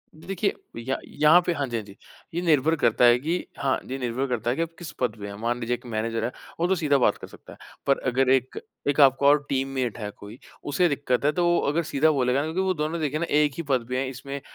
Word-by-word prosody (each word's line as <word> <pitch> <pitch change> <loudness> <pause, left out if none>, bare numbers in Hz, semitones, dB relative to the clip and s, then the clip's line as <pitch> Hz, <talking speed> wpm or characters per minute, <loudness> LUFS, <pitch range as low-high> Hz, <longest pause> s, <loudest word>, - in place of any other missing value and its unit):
देखिए 190 +5 -2 0.2
य 130 +3 -2
यहाँ 155 +4 +5
पे 175 - +1
हाँ 145 -3 -2
जी, 120 -1 -3
हाँ 110 - -4
जी, 100 -1 -14 0.4
ये 170 - -1
निर्भर 160 -2 +3
करता 120 -4 +3
है 120 0 +7
कि 165 +6 -2
हाँ 135 -1 +1
ये 135 - -3
निर्भर 125 +2 -2
करता 120 -2 -2
है 125 - +1
कि - - -2
आप 165 - -1
किस 170 -4 -7
पद 125 -4 0
पे 100 - -6
हैं? 100 - -7
मान 120 +1 -1
लीजिए 120 0 -1
1 120 - -15
मैनेजर 115 0 -2
हैं, 120 - -1 0.3
वो 170 - +2
तो 190 - +2
सीधा 150 -5 +2
बात 130 - +2
कर - - -10
सकता - - -14
है। - - -16 0.3
पर 140 - +4
अगर 130 +1 +2
एक 130 -1 +1 0.3
एक 145 +1 +1
आपका 135 +1 +5
और 145 0 +5
टीममेट 130 -3 -1
है 105 -2 -4
कोई, 105 +3 -12 0.3
उसे 145 +5 +2
दिक्कत 140 -2 -1
है 150 - +4
तो 175 +3 0
वो 175 0 +3
अगर 170 +3 0
सीधा 155 0 +2
बोलेगा 130 -2 +1
ना 145 - -1
क्योंकि 160 +4 -1
वो 190 -1 +1
दोनों 160 0 -2
देखिए 150 0 -1
ना 170 - 0
1 150 -1 +3
ही 170 - -3
पद 125 -3 +1
पे 125 - -1
हैं 135 - -1
इसमें 135 +2 -7
140 Hz, 270 wpm, -25 LUFS, 125-155 Hz, 0.4 s, है